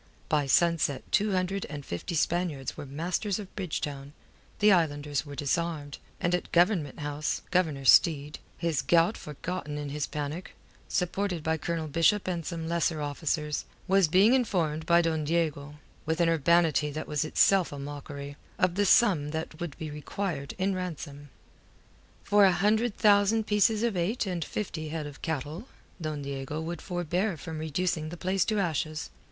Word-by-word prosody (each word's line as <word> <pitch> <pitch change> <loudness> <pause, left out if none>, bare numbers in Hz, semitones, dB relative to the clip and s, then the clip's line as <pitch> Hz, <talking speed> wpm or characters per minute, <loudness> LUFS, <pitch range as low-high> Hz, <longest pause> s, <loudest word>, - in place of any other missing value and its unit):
By 145 -2 +2
sunset 160 -3 +2
two 205 0 +2
hundred 185 +1 -1
and 145 -2 -7
fifty 85 - -4
Spaniards 160 -4 -1
were 145 - -7
masters 175 +8 -2
of 200 -3 -9
Bridgetown, 145 -7 -4 0.4
the 210 0 +5
islanders 145 -4 +1
were 145 - -7
disarmed, 150 0 -2 0.2
and 175 - 0
at 180 - -1
Government 170 -6 +2
House, 145 +1 -2
Governor 160 -7 +1
Steed 150 0 +5 0.2
his 165 -4 0
gout 170 +5 +3
forgotten 150 0 -5
in 145 -1 -4
his 145 0 -2
panic 150 +4 -5 0.3
supported 180 -2 -1
by 160 0 +1
Colonel 165 0 -3
Bishop 165 +7 +2
and 175 -2 -2
some 165 0 -4
lesser 170 -1 0
officers, 150 +1 -2 0.2
was 195 -2 +4
being 195 +9 +5
informed 170 -11 0
by 170 0 +5
Don 160 -2 0
Diego, 150 -2 -1 0.3
with 160 +1 0
an 170 -1 +4
urbanity 165 -1 +3
that 155 +2 -5
was 150 0 0
itself 185 +3 +3
a 145 - -6
mockery, 145 0 -7 0.2
of 180 -1 +2
the 205 +2 +1
sum 180 -11 +4
that 160 0 -5
would 170 -5 -5
be 155 -2 -5
required 150 -1 -4
in 195 +1 +1
ransom. 150 -6 -6 0.9
For 205 0 +4
a 190 - +6
hundred 210 +5 +1
thousand 210 +1 +4
pieces 210 +1 +3
of 235 -4 +1
eight 185 +7 0
and 180 -3 -2
fifty 160 -4 -4
head 155 -1 -4
of 145 -1 -9
cattle, 160 - -4 0.3
Don 155 -2 -3
Diego 140 +2 -4
would 165 +1 -5
forbear 175 +1 -1
from 160 +1 -6
reducing 160 0 -1
the 175 - -7
place 185 +1 +1
to 215 - 0
ashes. 160 -4 -2
165 Hz, 165 wpm, -28 LUFS, 150-185 Hz, 0.9 s, a